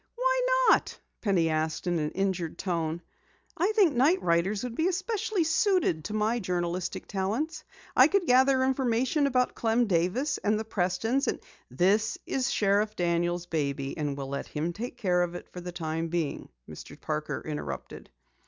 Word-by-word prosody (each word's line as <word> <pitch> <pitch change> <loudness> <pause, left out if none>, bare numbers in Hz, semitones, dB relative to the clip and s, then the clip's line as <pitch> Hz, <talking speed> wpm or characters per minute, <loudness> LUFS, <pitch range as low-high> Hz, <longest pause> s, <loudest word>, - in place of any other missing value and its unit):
"Why - - +1 0.3
not?" - - +2 0.2
Penny 190 -6 +2
asked 155 +1 -1
in 175 -2 0
an 150 -1 -1
injured 185 -4 -2
tone. 170 -2 -2 0.5
"I 370 +6 +1
think 395 -8 +4
night 295 +10 +4
riders 180 +5 +1
would 250 -2 -4
be 320 +8 +1
especially 380 +1 -1
suited 320 - +1
to 210 - -4
my 220 +3 +1
journalistic 180 -2 -2
talents. 245 - -2 0.3
I - - +8
could 395 -3 +1
gather 260 0 +4
information 260 +2 +1
about 250 -2 +1
Clem 230 +1 +1
Davis 200 - 0
and 210 +1 +1
the 220 - -4
Prestons 220 +7 0 0.3
" - - -30 0.2
"This 210 +3 +2
is 265 -1 -1
Sheriff 205 +1 +1
Daniel's 175 0 0
baby, 140 -5 -2
and 145 -3 -3
we'll 135 -1 -5
let 140 0 -4
him 160 +3 -3
take 240 +5 -6
care 180 -5 +1
of 175 0 -1
it - - -8
for 180 - -7
the 180 0 -6
time 165 -1 -3
being," 165 -3 -3 0.2
Mr. - - -11
Parker - - -3
interrupted. 75 -3 -6
200 Hz, 165 wpm, -28 LUFS, 170-260 Hz, 0.5 s, I